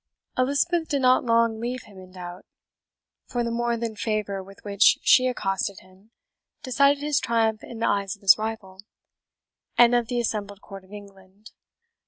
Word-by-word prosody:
Elizabeth 315 +6 +1
did 280 -3 -1
not 255 0 +4
long 230 -2 +2
leave 245 +1 -4
him 200 -3 -15
in 185 0 -14
doubt; 180 -1 -9 0.8
for 240 -1 -2
the 235 - -2
more 235 0 -1
than 230 -1 -4
favour 210 -2 -2
with 195 +1 -15
which 200 0 +4
she 255 0 +5
accosted 195 -5 -2
him 185 +3 -22 0.5
decided 280 +2 +2
his 295 -1 +1
triumph 225 -2 0
in 235 - -9
the 230 - 0
eyes 200 -1 -1
of 200 - -26
his 195 - +8
rival, 215 -4 -6 1.0
and 240 0 +6
of 240 -2 +2
the 245 +1 -2
assembled 205 -4 -3
court 195 -2 -11
of 190 - -22
England. 200 0 -14
220 Hz, 170 wpm, -24 LUFS, 195-240 Hz, 1.0 s, his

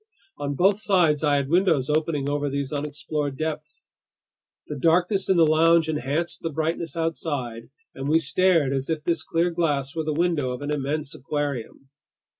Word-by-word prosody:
On 145 0 -2
both 195 +6 +3
sides 175 -8 +2
I 145 -1 +3
had 140 -1 0
windows 165 -5 +2
opening 150 -2 0
over 145 0 -1
these 140 0 -3
unexplored 145 -1 -3
depths. 155 0 -5 0.7
The 150 - -6
darkness 180 +6 +2
in 190 - +4
the 165 - +6
lounge 160 +1 +4
enhanced 150 +3 -2
the 165 - -2
brightness 160 +1 -2
outside, 145 -8 -3 0.2
and 135 +1 -4
we 160 - +5
stared 165 -2 +2
as 135 +1 -2
if 155 -2 -2
this 170 +1 0
clear 170 +2 0
glass 145 -5 -1
were 160 - -1
the 155 - -2
window 160 -6 0
of 125 - -7
an 145 - -3
immense 150 0 -2
aquarium. 140 -2 -4
150 Hz, 170 wpm, -24 LUFS, 140-165 Hz, 0.7 s, the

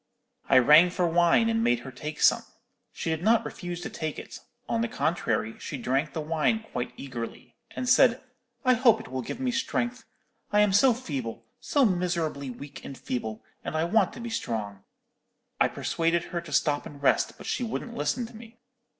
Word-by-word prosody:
"'I 130 - +6
rang 150 +8 +7
for 180 0 0
wine, 175 +6 +4
and 225 0 +1
made 120 0 +2
her 130 - -8
take 150 +4 -7
some. - - +5 0.5
She 165 - -3
did 160 0 -2
not 225 +4 +3
refuse 175 -1 -6
to - - -5
take 155 -2 -4
it; - - -8 0.3
on 230 - 0
the 235 - +1
contrary, 155 - -1
she 145 - -5
drank 135 +5 -1
the 160 - -3
wine 165 +8 0
quite 125 -1 -3
eagerly, 120 -4 -7 0.2
and 255 - -3
said, 255 -1 +5 0.5
'I 255 - +6
hope 230 -2 +4
it - - -10
will 130 0 -3
give 125 - -6
me 260 -1 0
strength. 250 -1 -2 0.5
I 210 - +4
am 210 -2 +3
so 240 +4 +5
feeble, 130 - -5
so 280 -3 +2
miserably 170 - -1
weak 140 +3 -9
and 135 - -8
feeble, 110 -3 -4 0.2
and - - -4
I 160 - +1
want 195 +2 +2
to - - -9
be 235 0 -5
strong.' 105 - -4 0.8
I - - +5
persuaded 165 +1 0
her 170 -1 -4
to 170 -3 -11
stop 145 0 +1
and 145 - -12
rest; 140 - +2
but - - -11
she - - -1
wouldn't 235 +1 -4
listen 190 +11 -1
to 230 - -12
me. 230 +1 -13
170 Hz, 195 wpm, -27 LUFS, 140-225 Hz, 0.8 s, rang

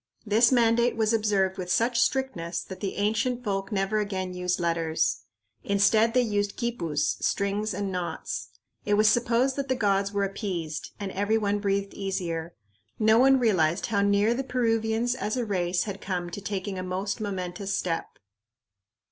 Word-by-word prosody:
This 225 +3 +4
mandate 235 -1 +3
was 220 0 +1
observed 200 -4 +1
with 180 -1 -3
such 235 +4 +2
strictness 215 -11 -1
that 190 -1 -9
the 195 -1 -3
ancient 225 +4 0
folk 195 -2 -2
never 200 +1 0
again 190 -3 -3
used 180 0 -1
letters. 165 -2 0 0.4
Instead, 215 +3 +3
they 250 - +5
used 205 -3 -1
quipus, 170 - -1
strings 200 +2 0
and 200 -1 -3
knots. 180 -2 -4 0.4
It 205 - +2
was 215 +1 +4
supposed 240 +4 +2
that 280 -1 -2
the 260 - +1
gods 200 -4 +1
were 200 -1 0
appeased, 185 -6 -4
and 200 -2 -4
every 205 +3 +1
one 205 -1 0
breathed 200 -1 -1
easier. 175 -4 -3 0.4
No 220 +1 +4
one 270 +1 +6
realized 185 -8 +2
how 205 -3 0
near 200 +3 +3
the 265 +3 -2
Peruvians 230 -2 0
as 235 -2 -3
a 245 - -1
race 180 -3 0
had 200 -2 -6
come 180 -2 -3
to 205 - -6
taking 195 -1 -4
a - - -3
most 190 +4 -3
momentous 190 -1 -3
step. 165 -2 -2
205 Hz, 165 wpm, -27 LUFS, 185-225 Hz, 0.4 s, one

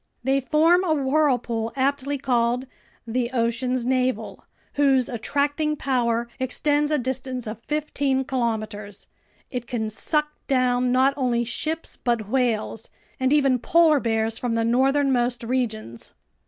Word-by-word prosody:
They 270 +2 +2
form 320 +7 +3
a 320 -4 +1
whirlpool 265 -6 +1
aptly 280 +1 0
called 245 -1 0 0.4
"the 235 +1 -1
ocean's 240 +1 0
navel," 255 -3 -1 0.3
whose 270 -3 +3
attracting 290 +5 -1
power 240 -4 0
extends 290 +3 +1
a 305 - +2
distance 255 -1 -3
of 215 +1 -6
fifteen 285 -3 0
kilometers. 215 -5 -3 0.5
It 245 -2 -4
can 220 -3 -2
suck 300 +7 0 0.2
down 250 -1 +2
not 260 +2 +4
only 245 -3 +1
ships 315 +8 -3
but 235 -4 -1
whales, 225 -2 -1 0.3
and 260 0 +1
even 275 -4 +3
polar 320 +3 +4
bears 225 -2 -1
from 240 -2 -1
the 225 0 +1
northernmost 255 -1 +2
regions. 225 - -3
255 Hz, 125 wpm, -24 LUFS, 235-280 Hz, 0.5 s, not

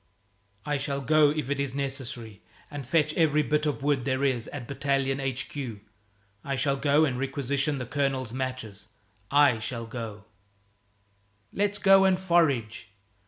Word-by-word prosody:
"I 145 -1 0
shall 140 0 -2
go 150 +2 +4
if 150 -3 -2
it's 140 -2 -2
necessary 125 -6 -4 0.3
and 145 -4 -6
fetch 150 +1 +2
every 150 -2 +3
bit 150 +1 0
of 145 -2 -2
wood 140 -3 +1
there 130 +1 -1
is 130 -4 0
at 130 -5 -7
Battalion 135 -1 0
H.Q. 135 -3 -4 0.6
I 140 - -2
shall 135 +1 +1
go 145 +3 +3
and 130 -4 -2
requisition 140 +1 -1
the 130 - -4
colonel's 130 -2 -1
matches 130 -6 -5 0.4
I 140 -5 +4
shall 115 +1 -4
go 115 -3 -7 0.7
" 100 0 -40
"Let's 205 0 0
go 195 -1 +6
and 185 -1 +3
forage." 140 - +1
135 Hz, 150 wpm, -27 LUFS, 120-145 Hz, 0.7 s, go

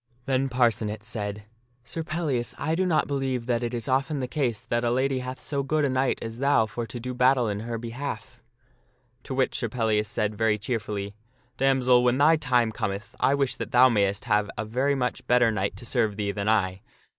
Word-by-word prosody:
Then 135 0 +1
Parcenet 110 -4 +1
said, 105 -3 -4 0.2
" 120 0 -40
Sir 130 +7 -5
Pellias, 155 -7 -2
I 160 +3 -1
do 185 +3 +1
not 160 -3 +2
believe 135 -4 -2
that 120 -1 0
it 120 -1 -2
is 120 -2 -4
often 135 +2 0
the 130 - -2
case 125 -7 -2
that 120 0 -1
a 120 - +2
lady 130 +2 +1
hath 130 +1 -6
so 140 -2 -2
good 150 +2 +1
a - - +1
knight 130 0 +1
as 115 +1 -6
thou 140 -4 +3
for 115 +2 -5
to 120 - -6
do 125 +2 -5
battle 125 -1 +3
in 100 -1 -2
her 115 +1 -4
behalf." 125 +1 -6 0.8
To 130 - -4
which 130 0 +1
Sir 120 - -2
Pellias 110 -2 0
said 105 0 -1
very 110 0 +1
cheerfully, 105 -2 -3 0.2
" 125 -1 -39
Damsel, 130 -2 +4
when 125 +1 +3
thy 150 +3 +5
time 125 -7 +1
cometh 100 0 -4
I 140 - +3
wish 140 -2 0
that - - -5
thou 125 +1 +7
mayst 100 -3 +1
have 105 -3 +1
a 105 - -2
very 130 +6 0
much 125 -2 -2
better 125 -2 +4
knight 100 -2 -2
to 110 - -10
serve 110 -5 0
thee 100 -1 -1
than 100 +1 -2
I." 95 -3 +1
120 Hz, 215 wpm, -26 LUFS, 110-130 Hz, 0.8 s, thou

